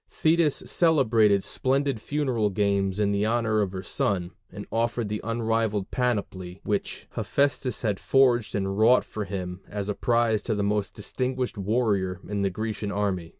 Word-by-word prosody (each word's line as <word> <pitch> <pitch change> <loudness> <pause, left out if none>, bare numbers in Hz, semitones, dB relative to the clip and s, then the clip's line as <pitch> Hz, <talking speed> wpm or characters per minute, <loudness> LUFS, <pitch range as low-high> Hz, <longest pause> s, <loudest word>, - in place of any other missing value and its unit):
Thetis 160 -2 +2
celebrated 115 - +3
splendid 135 -2 0
funeral 130 -8 0
games 100 -1 0
in 100 -1 +2
honor 110 -1 +1
of 100 -3 -1
her 95 -1 -6
son, 90 -1 -1 0.2
and 105 - -8
offered 115 -1 -1
the 105 0 -3
unrivalled 115 -3 -1
panoply 100 -7 -2
which 105 -1 -2
Hephæstus 135 -3 0
had 105 -4 0
forged 125 -4 +3
and 95 0 -1
wrought 120 +3 +5
for 105 -1 -5
him 90 -1 -5
as 100 0 -4
a - - +1
prize 115 -1 +1
to 110 - -2
the 100 - -1
most 105 0 -1
distinguished 125 +4 -3
warrior 100 -3 0
in 105 -1 -2
the 100 - +2
Grecian 105 +1 -4
army. 95 -5 -1
105 Hz, 155 wpm, -26 LUFS, 100-120 Hz, 0.2 s, wrought